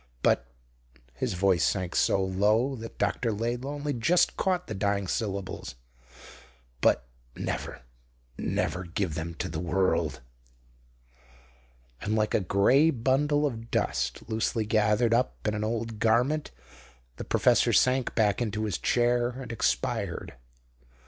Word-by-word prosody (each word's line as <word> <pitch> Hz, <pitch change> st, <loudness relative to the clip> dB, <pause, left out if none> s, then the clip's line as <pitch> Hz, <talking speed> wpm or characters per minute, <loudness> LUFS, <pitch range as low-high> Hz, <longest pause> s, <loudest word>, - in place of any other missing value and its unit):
But" -, -, +2 dB, 0.7 s
his 65 Hz, -, -2 dB
voice 95 Hz, -1 st, +2 dB
sank 90 Hz, -3 st, 0 dB
so 95 Hz, -, +3 dB
low 105 Hz, +8 st, +2 dB
that 115 Hz, 0 st, -9 dB
Dr. 110 Hz, +3 st, 0 dB
Laidlaw 120 Hz, +6 st, -2 dB
only 145 Hz, 0 st, -3 dB
just 125 Hz, +9 st, +2 dB
caught 180 Hz, -2 st, 0 dB
the 110 Hz, -, -5 dB
dying 100 Hz, 0 st, 0 dB
syllables 95 Hz, -, -3 dB, 1.1 s
"but -, -, +3 dB, 0.3 s
never, -, -, -4 dB, 0.5 s
never 90 Hz, -, -2 dB
give 85 Hz, -1 st, -2 dB
them 80 Hz, +2 st, -5 dB
to -, -, -3 dB
the 80 Hz, 0 st, -4 dB
world." 90 Hz, -5 st, 0 dB, 1.8 s
And 105 Hz, +2 st, -1 dB
like 110 Hz, -1 st, +1 dB
a -, -, +4 dB
grey 100 Hz, -, +4 dB
bundle 145 Hz, +3 st, +1 dB
of 115 Hz, -4 st, -4 dB
dust -, -, -1 dB
loosely 110 Hz, 0 st, -1 dB
gathered 110 Hz, +2 st, +2 dB
up 120 Hz, -1 st, 0 dB
in 105 Hz, -, +1 dB
an 105 Hz, 0 st, -2 dB
old 115 Hz, 0 st, -3 dB
garment 125 Hz, +8 st, +2 dB, 0.7 s
the -, -, -5 dB
professor -, -, +3 dB
sank 130 Hz, 0 st, +2 dB
back 105 Hz, 0 st, +2 dB
into 110 Hz, -2 st, -2 dB
his 105 Hz, -6 st, -2 dB
chair 120 Hz, 0 st, +2 dB
and 125 Hz, 0 st, -7 dB
expired. 65 Hz, -, -1 dB
110 Hz, 130 wpm, -28 LUFS, 100-125 Hz, 1.8 s, a